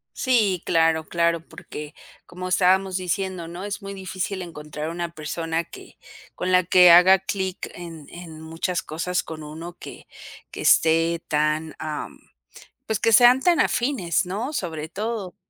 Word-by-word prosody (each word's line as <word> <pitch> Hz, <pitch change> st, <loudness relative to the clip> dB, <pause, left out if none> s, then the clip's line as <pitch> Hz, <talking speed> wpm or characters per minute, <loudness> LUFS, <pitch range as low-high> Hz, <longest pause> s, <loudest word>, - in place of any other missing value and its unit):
Sí, 215 Hz, -9 st, +1 dB
claro, 160 Hz, -1 st, +2 dB
claro, 170 Hz, -1 st, +1 dB
porque 150 Hz, 0 st, -9 dB, 0.3 s
como 185 Hz, +1 st, -7 dB
estábamos 190 Hz, +1 st, +3 dB
diciendo, 185 Hz, -1 st, -3 dB
¿no? 175 Hz, +2 st, -8 dB
Es 205 Hz, +1 st, -5 dB
muy 195 Hz, -, -6 dB
difícil 190 Hz, 0 st, -4 dB
encontrar 150 Hz, -2 st, -6 dB
una 170 Hz, 0 st, -4 dB
persona 165 Hz, +1 st, -3 dB
que -, -, -14 dB, 0.4 s
con 185 Hz, -, -2 dB
la 185 Hz, 0 st, +5 dB
que 180 Hz, 0 st, +6 dB
haga 180 Hz, +3 st, +7 dB
clic 190 Hz, -1 st, -4 dB
en 165 Hz, -4 st, -9 dB
en 165 Hz, -3 st, -10 dB
muchas 165 Hz, +3 st, -3 dB
cosas 180 Hz, +2 st, -2 dB
con 155 Hz, -1 st, -8 dB
uno, 160 Hz, +3 st, -8 dB
que -, -, -11 dB, 0.4 s
que -, -, -8 dB
esté 165 Hz, +1 st, +3 dB
tan, 155 Hz, +1 st, 0 dB
am, 155 Hz, -1 st, -5 dB, 0.7 s
pues 220 Hz, -2 st, -1 dB
que 225 Hz, -, +2 dB
sean 245 Hz, +3 st, +7 dB
tan 345 Hz, -1 st, +3 dB
afines, 235 Hz, -9 st, +1 dB
¿no?, 215 Hz, +11 st, -4 dB
sobre 165 Hz, -, -4 dB
todo. 205 Hz, 0 st, -4 dB
175 Hz, 150 wpm, -23 LUFS, 160-190 Hz, 0.7 s, haga